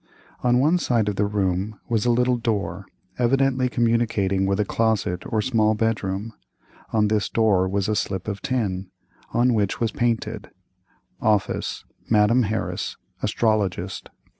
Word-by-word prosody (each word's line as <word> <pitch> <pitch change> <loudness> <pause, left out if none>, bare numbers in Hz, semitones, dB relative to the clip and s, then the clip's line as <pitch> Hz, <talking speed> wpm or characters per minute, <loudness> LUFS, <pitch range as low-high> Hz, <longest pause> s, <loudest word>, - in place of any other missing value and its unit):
On 125 0 +3
one 155 +7 +3
side 120 -8 +1
of 105 - -3
the 100 +1 +1
room 100 0 -1
was 115 -1 0
a - - +4
little 125 +1 +3
door, 100 -5 -2 0.3
evidently 130 +1 +2
communicating 115 -5 +1
with 100 +1 0
a 105 - +2
closet 110 -5 0
or 110 -1 +1
small 110 -4 +2
bedroom; 105 -1 -1 0.6
on 105 -1 +3
this 105 -1 0
door 100 -5 +2
was 100 0 0
a 105 - 0
slip 95 -2 -2
of 100 -2 -4
tin, 100 -8 -2 0.4
on 120 +1 +3
which 105 -3 0
was 115 -1 0
painted 115 -3 -2 0.2
+ 95 0 -47
+ 90 - -45
| - - -37
| - - -47
| - - -36
Office.—Madam 105 +2 +1
Harris, 110 -1 -3 0.2
Astrologist. 100 -5 -1
110 Hz, 160 wpm, -23 LUFS, 100-115 Hz, 0.6 s, a